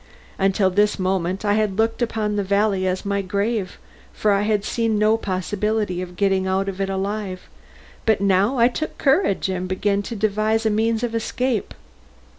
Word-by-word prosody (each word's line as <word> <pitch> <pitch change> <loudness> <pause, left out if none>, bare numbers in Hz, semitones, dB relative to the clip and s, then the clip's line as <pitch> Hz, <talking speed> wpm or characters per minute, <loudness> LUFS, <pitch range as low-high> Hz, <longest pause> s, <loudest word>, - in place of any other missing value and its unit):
Until 195 0 +2
this 205 +2 +2
moment 185 +1 -1
I 205 - +3
had 210 -2 0
looked 225 +2 0
upon 220 -3 -1
the 205 - 0
valley 200 -1 +1
as 185 +2 -2
my 200 0 0
grave, 200 +1 -2 0.3
for 210 - +1
I 200 0 +3
had 210 -1 0
seen 225 -2 0
no 215 +1 +4
possibility 205 -1 -2
of 180 -1 -7
getting 190 -1 +1
out 190 +1 0
of 195 0 -4
it 195 - -1
alive, 195 -1 -3 0.6
but 220 -2 +4
now 200 +6 +2
I 235 0 +6
took 310 +5 -4
courage 270 - +2
and 185 -1 -3
began 200 +2 0
to 230 +3 -6
devise 215 +2 0
a 220 - +3
means 225 +2 +1
of 235 -2 -2
escape. 230 +1 -2
205 Hz, 180 wpm, -22 LUFS, 190-220 Hz, 0.6 s, I